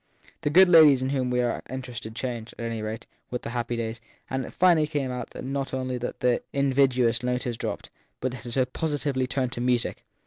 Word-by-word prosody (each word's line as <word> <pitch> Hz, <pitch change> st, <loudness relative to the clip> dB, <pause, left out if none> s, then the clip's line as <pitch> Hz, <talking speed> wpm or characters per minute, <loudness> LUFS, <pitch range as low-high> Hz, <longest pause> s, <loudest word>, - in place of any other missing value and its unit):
The -, -, 0 dB
good 185 Hz, +5 st, +7 dB
ladies 155 Hz, -6 st, +7 dB
in 130 Hz, -, 0 dB
whom 130 Hz, -2 st, 0 dB
we 125 Hz, 0 st, +2 dB
are 120 Hz, -1 st, -1 dB
interested 125 Hz, -4 st, -6 dB
changed, 120 Hz, -2 st, -4 dB
at 115 Hz, -, -4 dB
any 115 Hz, -1 st, -3 dB
rate, 110 Hz, +1 st, -5 dB, 0.2 s
with 125 Hz, -, -4 dB
the 115 Hz, -, -5 dB
happy 120 Hz, 0 st, -2 dB
daj^s, 115 Hz, 0 st, -3 dB, 0.3 s
and 130 Hz, 0 st, -1 dB
it -, -, -10 dB
finally 170 Hz, -4 st, +4 dB
came 145 Hz, -4 st, -2 dB
out 125 Hz, -2 st, -5 dB
not 135 Hz, 0 st, -3 dB
only 130 Hz, -1 st, -2 dB
that 120 Hz, -, -5 dB
the 125 Hz, -1 st, +2 dB
invidious 130 Hz, -4 st, +3 dB
note 125 Hz, 0 st, -1 dB
had 120 Hz, -4 st, -3 dB
dropped, 105 Hz, -3 st, -4 dB, 0.3 s
but 130 Hz, -, -1 dB
that 125 Hz, -1 st, -8 dB
it 120 Hz, -, -4 dB
had 130 Hz, -1 st, +1 dB
positively 145 Hz, -5 st, -1 dB
turned 130 Hz, 0 st, -1 dB
to 120 Hz, -, -4 dB
music. 125 Hz, -1 st, 0 dB
125 Hz, 215 wpm, -26 LUFS, 120-135 Hz, 0.3 s, good